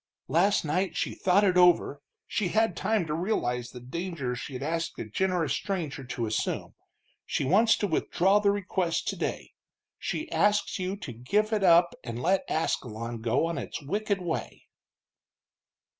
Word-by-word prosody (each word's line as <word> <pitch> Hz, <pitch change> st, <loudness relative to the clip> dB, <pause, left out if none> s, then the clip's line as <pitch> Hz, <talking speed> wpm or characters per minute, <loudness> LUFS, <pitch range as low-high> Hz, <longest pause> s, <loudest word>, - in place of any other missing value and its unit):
"Last 175 Hz, +6 st, +3 dB
night 170 Hz, +3 st, -1 dB
she -, -, -1 dB
thought 190 Hz, +2 st, +3 dB
it 185 Hz, -3 st, +3 dB
over; 175 Hz, -5 st, +4 dB, 0.2 s
she 205 Hz, -, -1 dB
had 220 Hz, 0 st, +2 dB
time 210 Hz, -2 st, 0 dB
to 150 Hz, -, -3 dB
realize 125 Hz, -, -1 dB
the 125 Hz, -, -10 dB
danger 140 Hz, -1 st, -4 dB
she'd 130 Hz, +1 st, -6 dB
asked 165 Hz, +2 st, -2 dB
a -, -, -4 dB
generous 175 Hz, -, 0 dB
stranger 165 Hz, -9 st, -3 dB
to 125 Hz, -2 st, -3 dB
assume. 110 Hz, 0 st, -2 dB, 0.5 s
She -, -, -2 dB
wants 215 Hz, -, +4 dB
to -, -, 0 dB
withdraw 190 Hz, +3 st, +2 dB
the 205 Hz, -1 st, +3 dB
request 185 Hz, -4 st, -1 dB
today -, -, -3 dB, 0.5 s
she 315 Hz, -, -3 dB
asks 205 Hz, -4 st, +2 dB
you 185 Hz, +2 st, -2 dB
to 145 Hz, -, -7 dB
give 205 Hz, -, 0 dB
it 210 Hz, -2 st, +1 dB
up 175 Hz, -1 st, +6 dB
and 115 Hz, -1 st, -5 dB
let 185 Hz, +8 st, +1 dB
Ascalon 115 Hz, -6 st, -2 dB
go 120 Hz, +7 st, +1 dB
on 170 Hz, 0 st, -2 dB
its -, -, -5 dB
wicked 200 Hz, +6 st, -1 dB
way." 170 Hz, -2 st, -4 dB
175 Hz, 160 wpm, -28 LUFS, 135-195 Hz, 0.5 s, up